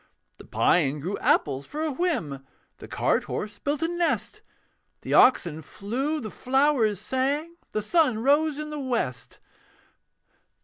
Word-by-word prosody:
The - - -12
pine 150 -4 +2
grew 180 +8 -3
apples 140 -2 +1
for 305 +2 -4
a 315 - -1
whim, 215 - -2 0.4
The - - -10
cart - - 0
horse 205 -1 -5
built 290 +2 -2
a - - +2
nest; 345 0 -1 0.6
The - - -4
oxen 170 -11 +4
flew, 255 - -3
the 215 -6 -6
flowers 260 -6 +2
sang, 280 +9 -2
The 215 - -2
sun 300 -2 +2
rose 290 +5 +2
in 305 0 -5
the 300 - -5
west. 235 - -3
260 Hz, 140 wpm, -26 LUFS, 200-300 Hz, 0.6 s, oxen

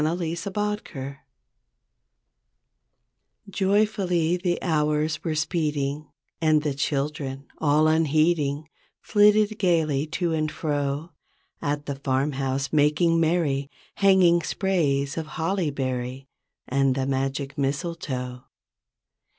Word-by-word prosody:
THE 155 - +2
OLD, 175 +2 -2 0.4
OLD 210 0 0
STORY 140 -1 -7 2.3
Joyfully 190 -4 +1
the 180 -1 -1
hours 150 -2 0
were 160 -2 -1
speeding, 150 -2 -1 0.3
And 155 -2 +3
the 150 -2 0
children, 140 -1 -2
all 155 0 +3
unheeding 155 -1 +2 0.3
Flitted 210 0 +3
gaily 160 -6 +1
to 165 +1 -1
and 155 -1 0
fro. 145 +1 -2 0.5
At 145 0 -2
the 140 -1 -4
farmhouse 135 0 -1
making 155 +3 +3
merry. 155 -4 +1 0.3
Hanging 190 -4 +5
sprays 150 -7 0
of 160 - -5
holly 170 0 0
berry 130 -1 -3 0.4
And 135 0 +2
the 135 -1 -1
magic 135 +1 -2
mistletoe. 135 -4 -3
150 Hz, 100 wpm, -25 LUFS, 140-170 Hz, 2.3 s, Hanging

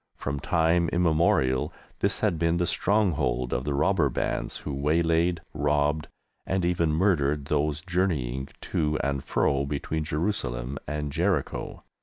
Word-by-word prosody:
From 70 0 -3
time 80 +3 +2
immemorial 80 -6 +2 0.3
this - - 0
had 80 - +1
been 85 0 +2
the 85 - +1
stronghold 75 - +1
of 65 +2 -1
the 70 -1 -1
robber 75 0 +2
bands - - -2
who 75 - -5
waylaid, 80 +4 +1
robbed, 75 +1 +1 0.4
and 95 -2 -1
even 85 -2 +1
murdered 75 -5 +2
those 75 +1 0
journeying 75 -8 -1
to 75 0 0
and 70 -1 -1
fro 70 0 +1
between 75 +2 -2
Jerusalem 70 -6 -2
and 75 0 -3
Jericho. - - -1
75 Hz, 135 wpm, -27 LUFS, 70-85 Hz, 0.4 s, time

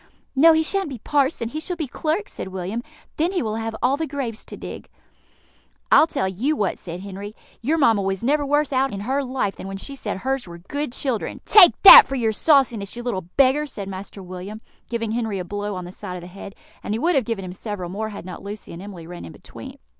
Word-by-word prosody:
"No, 325 +5 +7
he 320 0 +3
shan't 390 +1 0
be 265 - -6
parson 270 -1 0
he 305 - -4
shall 360 +3 -3
be 320 -3 -3
clerk," 320 +9 -2
said - - -7
William; 190 +4 -4 0.4
"then 335 +5 +1
he 360 - 0
will 220 -1 -2
have 225 0 -4
all 265 +3 +3
the 320 +1 -2
graves 260 -6 -4
to - - -9
dig." - - -9 1.0
"I'll 315 - +7
tell 190 - -1
you 235 +12 -1
what," 205 -8 -1
said 175 0 -7
Henry: 200 +2 -8 0.3
"your 300 +8 +1
mamma 225 -9 +4
was 195 +2 -2
never 290 +4 +2
worse 290 0 +1
out 265 +1 +2
in 200 - -5
her 265 +6 -1
life 250 -6 -2
than - - -7
when 195 0 -5
she 280 +8 -7
said 220 -8 -4
hers 265 +2 -2
were 170 0 -9
good 285 - -4
children." 255 -6 -2
"Take 390 -5 +7
that 460 +4 +12
for 270 - -3
your 230 -4 +1
sauciness, 235 -6 +2
you 240 - -6
little 190 -8 -3
beggar!" 275 +2 +4
said 205 -8 -6
Master 195 +1 -8
William, 185 +4 -8 0.3
giving 230 -2 -2
Henry 225 -3 -2
a 180 - -4
blow 205 +1 -4
on 180 -1 -6
the 175 - -8
side 185 -1 -7
of 180 - -7
the - - -10
head; 195 +2 -10 0.3
and 210 - -2
he - - -2
would 345 +7 +2
have 270 - +2
given 205 -4 -3
him 180 - -7
several 200 -2 -5
more 215 +3 -3
had 200 -4 -9
not 180 -2 -8
Lucy 205 -1 -8
and 170 - -8
Emily 190 -4 -9
run 175 +1 -9
in 85 - -9
between. - - -11
225 Hz, 240 wpm, -22 LUFS, 195-280 Hz, 1.0 s, that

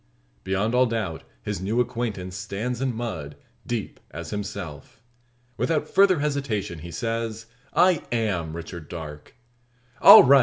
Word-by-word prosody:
Beyond 100 +4 0
all 125 0 +5
doubt 110 -8 -3 0.2
his 105 -2 -3
new 105 +5 0
acquaintance 115 -7 -2
stands 105 +6 -3
in 135 -1 +1
mud, 90 -12 -4 0.3
deep - - -3
as - - -7
himself. 100 -6 -6 0.6
Without 160 -2 0
further 190 -5 +4
hesitation, 135 - -2
he 85 +3 -8
says 115 +4 -3 0.3
"I 180 -3 +5
am 95 -9 -1
Richard 85 -2 -8
Darke." 75 -3 -8 0.7
"All - - +12
right!" 140 +1 +7
110 Hz, 130 wpm, -25 LUFS, 90-125 Hz, 0.7 s, All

